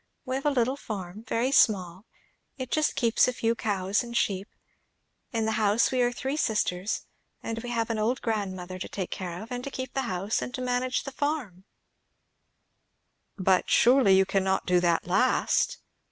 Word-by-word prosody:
We 255 - -3
have 270 +2 -1
a - - +6
little 260 -1 +1
farm, 205 -3 -7
very 240 +4 0
small; 190 -5 +2 0.5
it 260 -2 -6
just 310 -1 +1
keeps 230 -2 +3
a 250 - 0
few 230 -1 +1
cows 200 -3 0
and 235 -1 -4
sheep. 195 -2 0 0.8
In 225 -2 0
the 220 - +1
house 210 +2 +3
we 255 -1 +1
are 245 0 +3
three 265 +4 -3
sisters; 210 -6 -1 0.4
and 225 0 -4
we 245 - -6
have 230 -1 -1
an 220 - -2
old 235 +4 +1
grandmother 190 -5 -3
to - - -5
take 190 -3 -4
care 180 +1 -5
of, 230 - -13
and 245 0 -4
to 280 - -4
keep 260 -1 -6
the 270 - 0
house, 190 +4 -1
and 250 - -5
manage 250 0 -1
the 275 - -6
farm." 270 - -3 1.7
"But 190 -1 +2
surely 240 -6 +5
you 190 - +4
cannot 190 0 0
do 180 0 +3
that 170 -1 +1
last?" 255 - +2
225 Hz, 180 wpm, -27 LUFS, 190-255 Hz, 1.7 s, a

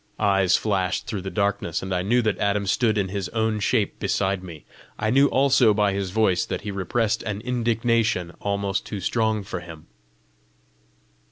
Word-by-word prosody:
Eyes 95 -3 +3
flashed 95 -4 -1
through 105 -4 -4
the 95 - -5
darkness, 100 -5 -1
and 95 0 -3
I 90 - 0
knew 120 +6 +2
that 110 -2 0
Adam 100 0 0
stood 110 +2 +1
in 95 -2 0
his 100 -2 -3
own 110 -1 0
shape 105 0 0
beside 95 -1 0
me. 85 -5 -10 0.3
I 110 0 0
knew 135 +3 +5
also 130 -6 +4
by 105 -2 +2
his 100 -1 -2
voice 95 -3 +2
that - - -4
he 105 0 -5
repressed 100 +3 -1
an 105 -2 -4
indignation 115 -6 0
almost 100 -1 -1
too 105 - -6
strong 110 +2 0
for 95 -2 -5
him. 80 -2 -11
100 Hz, 175 wpm, -24 LUFS, 95-110 Hz, 0.3 s, knew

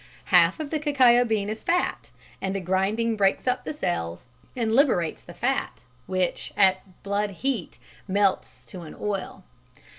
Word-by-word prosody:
Half 175 - +5
of 305 -2 -5
the 310 - 0
cacao 260 -5 +5
bean 215 -3 0
is 215 +1 -5
fat, 355 +1 0 0.3
and 190 0 -2
the - - 0
grinding 195 +5 0
breaks 195 +3 +1
up 250 0 +1
the - - -3
cells 125 - -3 0.3
and 225 -3 0
liberates 230 - +2
the 175 - -13
fat, 270 +3 -2 0.2
which 185 -1 -1
at 190 -1 +1
blood 205 +1 -1
heat 225 0 -3 0.3
melts 200 0 0
to 185 - -8
an 160 - -10
oil. 195 -2 -4
200 Hz, 155 wpm, -25 LUFS, 185-245 Hz, 0.3 s, Half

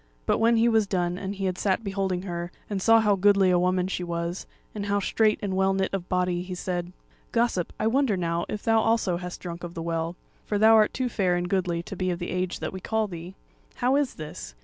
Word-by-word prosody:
But - - +2
when 230 +1 +4
he 230 +1 +4
was 220 -3 +3
done 180 -2 -1
and 195 +1 -4
he 195 0 -3
had 185 -1 -2
sat 195 +2 +1
beholding 195 -2 -2
her, 175 -2 -4 0.2
and 195 -2 -1
saw 225 +2 +6
how 210 -2 +3
goodly 195 -1 +4
a 180 - +4
woman 180 0 +1
she 185 -1 -3
was, 170 +1 -3 0.3
and 205 -1 -4
how 200 0 +1
straight 215 +2 +2
and 195 -2 -1
well 190 0 +2
knit 190 0 -1
of 185 -2 -3
body, 180 -1 +1
he 180 0 -6
said: 175 -1 -3 0.4
"Gossip, 230 -7 +1
I - - 0
wonder 235 -2 +2
now, 170 -1 -1
if 210 - -4
thou 225 0 +4
also 220 -5 +1
hast 180 0 -7
drunk 175 -1 -7
of 175 0 -7
the 165 - -4
Well; 165 0 -2 0.3
for 210 - -1
thou 220 +2 +6
art 215 -1 +5
too 255 -1 -1
fair 190 -6 +1
and 175 0 -1
goodly 180 -3 0
to 195 - -7
be 185 0 -1
of 175 - -1
the 175 - -5
age 180 0 -2
that - - -3
we 190 - -5
call 220 +3 0
thee. 175 0 -8 0.4
How 250 +2 +2
is 285 -2 0
this! 150 - -8
190 Hz, 245 wpm, -26 LUFS, 175-210 Hz, 0.4 s, saw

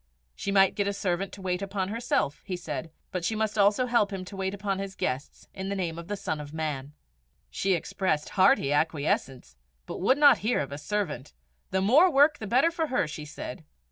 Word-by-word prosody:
She 200 - -3
might 195 -1 +5
get 200 -1 -1
a 200 - 0
servant 190 -1 -2
to 195 - -10
wait 180 0 -1
upon 195 -1 -2
herself, 210 - -1
he 185 - -4
said, 170 -2 -5 0.2
but 180 -2 -3
she 220 +6 0
must 215 -1 0
herself 205 +4 +3
help 215 -4 +3
him 190 -2 -5
to 185 - -9
wait 190 0 -2
upon 195 -1 -2
his 195 -1 -5
guests, 130 +4 -4
in 190 +1 -5
the 200 - -2
name 170 -4 -3
of 170 - -9
the 205 - -2
Son 160 -6 -3
of 145 +1 -9
Man. 150 -3 -3 0.6
She 195 0 +1
expressed 170 -2 -1
hearty 190 - +4
acquiescence, 140 - -1 0.3
but - - -6
would 260 +8 +4
not 290 -1 +7
hear 230 +4 +1
of 140 -1 -3
a 140 - -5
servant: 180 - -3 0.4
the 190 0 0
more 280 - +6
work 290 +2 +5
the 215 - -5
better 260 +10 +3
for 330 -1 -1
her! 260 - +1
she 150 0 -7
said. 145 - -8
195 Hz, 215 wpm, -27 LUFS, 160-210 Hz, 0.6 s, not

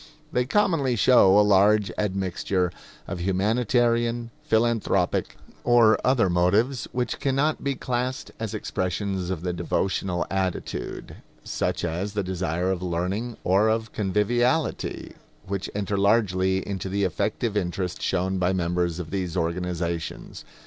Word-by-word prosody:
They 125 0 0
commonly 165 -10 +2
show 100 -3 +6
a 105 - +6
large 100 0 +4
admixture 95 -2 -1 0.4
of 90 -3 -4
humanitarian, 115 +4 +1
philanthropic, 115 0 +1 0.3
or 120 -2 +5
other 125 -5 +3
motives 100 +9 +2
which 125 -1 -2
can 135 -1 0
not 150 +3 +1
be 140 -1 0
classed 125 +1 -3
as - - -4
expressions 95 0 -2
of 90 -3 -3
the 90 -1 -1
devotional 90 +1 -1
attitude; 95 -2 -3 0.3
such - - -2
as 90 +5 -3
the 105 -1 -1
desire 90 -1 -1
of 90 -2 -2
learning 95 +7 -2
or 100 +4 +3
of 110 0 -1
conviviality, 120 - 0 0.3
which 100 0 -3
enter 100 -1 -1
largely 95 -3 +2
into 95 -1 -4
the 100 +1 0
effective 105 +4 -1
interest 90 -2 -2
shown 95 +1 0
by 90 +1 +2
members 90 -1 0
of 85 -3 -6
these 95 -3 -2
organizations. 85 -1 -3
100 Hz, 130 wpm, -25 LUFS, 90-115 Hz, 0.4 s, show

